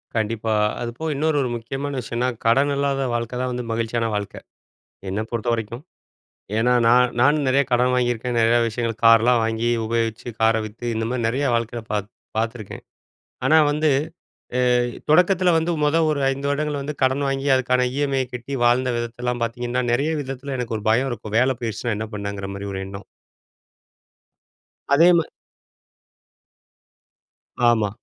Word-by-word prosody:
கண்டிப்பா. 110 0 -1 0.3
அதுப்போக 120 +7 -3
இன்னொரு 155 +1 +1
ஒரு 125 - -1
முக்கியமான 135 +4 -4
விஷயம்னா, 120 +1 -2 0.2
கடன் 135 +5 +3
இல்லாத 140 -1 0
வாழ்க்கை 120 +1 -3
தான் 130 0 -2
வந்து 125 0 -3
மகிழ்ச்சியான 115 0 -1
வாழ்க்கை! 105 -1 -4 0.7
என்ன 100 +3 -2
பொறுத்த 115 0 -3
வரைக்கும். 115 +3 -5 0.8
ஏன்னா 120 +2 +2
நான் 125 +1 +5
நானும் 145 +3 +3
நெறைய 135 +2 +3
கடன் 125 +1 +3
வாங்கியிருக்கேன். 120 -1 -1
நெறைய 115 +1 +4
விஷயங்கள் 115 0 -3
கார்லாம் 115 +1 +6
வாங்கி 115 +1 -1 0.2
உபயோகிச்சு, 115 0 -2
கார 110 0 +4
வித்து 110 +3 -9
இந்த 115 - -1
மாதிரி 125 -2 -1
நெறைய 135 +5 -1
வாழ்க்கையில 115 0 -2
பாத் 105 -1 -2 0.3
பார்த்துருக்கேன். 115 -2 -5 0.6
ஆனா 160 - +5
வந்து 150 0 +1 0.7
அ, - - +1 0.5
தொடக்கத்தில 180 +2 +4
வந்து 165 +2 +1
மொத 150 +2 +3
ஒரு 150 - 0
5 140 +1 -2
வருடங்கள் 150 0 -1
வந்து 145 +2 -4
கடன் 130 +2 +2
வாங்கி 135 +1 -2
அதுக்கான 125 0 +1
ஈ.எம்.ஐ.ய 135 -2 0
கட்டி 125 +3 -6
வாழ்ந்த 125 +2 +3
விதத்தலாம் 120 +1 -3
பார்த்தீங்கன்னா, 120 +2 -2
நெறைய 140 +6 +1
விதத்தில 135 +1 -6
எனக்கு 120 -2 -3
ஒரு 105 - -8
பயம் 125 +5 +2
இருக்கும். 110 -2 -6
வேல 130 +1 +2
போயிடுச்சுனா 115 0 -2
என்ன 110 - -4
பண்ணங்கிற 100 -1 -5
மாரி 100 +1 -6
ஒரு 95 - -4
எண்ணம். 100 +1 -9 1.9
அதே 165 +5 +6
மார் 165 - -1 2.4
ஆமா. 110 -3 +2
120 Hz, 150 wpm, -22 LUFS, 115-135 Hz, 2.4 s, கார்லாம்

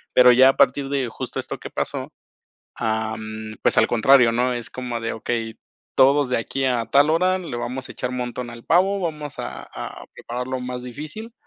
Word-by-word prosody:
Pero 125 0 +8
ya 130 +2 +7
a - - +1
partir 135 0 +3
de 135 -4 -1
justo 110 - -5
esto - - -5
que - - -8
pasó, - - -3 0.7
ah, 110 0 -1
mm, 110 0 -7
pues - - +2
al 110 - +5
contrario, 120 +1 +5
¿no?, 125 +1 +1
es 120 -2 -4
como 125 -2 -4
de 115 - -3
okey, 115 0 -3 0.4
todos 140 +1 +5
de 125 - +1
aquí 135 +4 -2
a 120 -3 +1
tal 145 +2 +4
hora 185 +3 +2
le 165 -9 -6
vamos 130 +2 -4
a - - -8
echar 125 - -3
montón 125 -1 -4
al 120 0 -11
pavo, 195 +4 +3
vamos 150 -4 -4
a - - -6
a - - -7
preparar 125 +1 -5
lo 130 -1 -2
más 125 0 -5
difícil, 155 - -7
125 Hz, 205 wpm, -22 LUFS, 120-140 Hz, 0.7 s, Pero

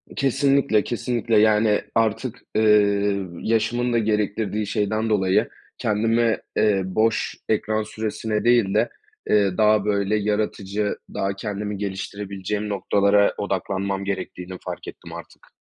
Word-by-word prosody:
Kesinlikle, 135 -4 +2
kesinlikle. 120 -2 -1
Yani, 105 0 +3
artık, 115 +2 0 0.2
eee, 100 -2 +3 0.2
yaşımın 120 +2 0
da - - +3
gerektirdiği 105 -1 -1
şeyden 110 +1 -1
dolayı 95 -3 +2 0.3
kendime, 115 +2 +1 0.2
eee, 105 -3 +3
boş 110 +4 0
ekran 110 0 0
süresine 110 0 -3
değil 120 -5 +3
de, - - +2 0.4
eee, 100 -3 +3
daha 105 -1 +4
böyle 100 0 +1
yaratıcı, 105 -1 -1 0.2
daha 100 0 -1
kendimi 105 0 -4
geliştirebileceğim 100 +1 -4
noktalara 100 0 +2
odaklanmam 95 0 -2
gerektiğini 95 -1 -5
fark - - -6
ettim - - -10
artık. - - -12
105 Hz, 115 wpm, -23 LUFS, 100-110 Hz, 0.4 s, daha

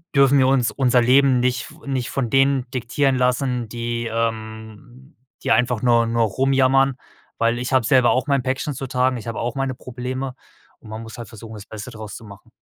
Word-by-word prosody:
dürfen 140 0 +5
wir 130 - +4
uns 130 -2 +2
unser 125 -2 +2
Leben 130 +1 +4
nicht 125 -1 -1
f - - -17
nicht 130 -3 -2
von 125 -4 -1
denen 135 0 +2
diktieren 130 +2 0
lassen, 125 -2 0
die, 120 0 -3
ähm 110 +3 -5 0.3
die - - 0
einfach 125 -2 +2
nur 120 -2 +3
nur 115 0 0
rumjammern, 135 +3 +2 0.4
weil 115 +1 +2
ich 125 +2 -3
habe 130 -2 +4
selber 125 +1 +4
auch 130 - 0
mein 140 -3 +1
Päckchen 130 +3 -2
zu 135 - -5
tragen. 125 +1 +1
Ich 110 - -9
habe 115 - -4
auch 120 0 -3
meine 135 -1 -1
Probleme 130 +1 -5 0.4
und 110 - -14
man 110 +1 -6
muss 115 - -10
halt 120 - -8
versuchen, 110 0 -10
das 105 -1 -10
Beste 110 +2 -8
daraus 110 -3 -8
zu - - -10
machen. 100 +2 -14
125 Hz, 205 wpm, -21 LUFS, 115-130 Hz, 0.4 s, dürfen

